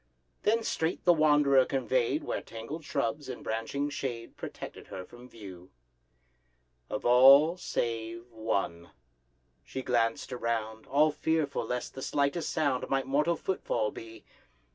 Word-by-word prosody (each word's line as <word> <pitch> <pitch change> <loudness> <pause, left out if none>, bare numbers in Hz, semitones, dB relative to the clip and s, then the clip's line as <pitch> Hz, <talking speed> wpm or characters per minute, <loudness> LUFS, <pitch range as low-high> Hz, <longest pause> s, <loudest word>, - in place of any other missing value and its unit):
Then 225 +2 +2
straight 160 -5 -2
the 175 - +7
wanderer 145 -4 +5
convey'd 130 +1 0
Where - - -3
tangled 115 +9 -8
shrubs, 145 -1 -2
in 125 - -7
branching 125 +6 -2
shade, 120 -5 -5
Protected - - -8
her 95 -1 -7
from 120 +5 -14
view— 95 -6 -11 1.2
Of 105 - -4
all 135 +7 +7
save 115 -8 -3
one. 100 -7 -2 0.7
She 130 - -6
glanced 120 +1 0
around, 110 -2 -3
All 150 +3 +4
fearful 155 -1 -1
lest 125 0 -3
the 135 - -8
slightest 145 +5 0
sound 145 -6 0
Might 135 -1 +1
mortal 150 +5 +2
footfall 120 - -1
be. 115 0 -11
130 Hz, 130 wpm, -30 LUFS, 115-150 Hz, 1.2 s, the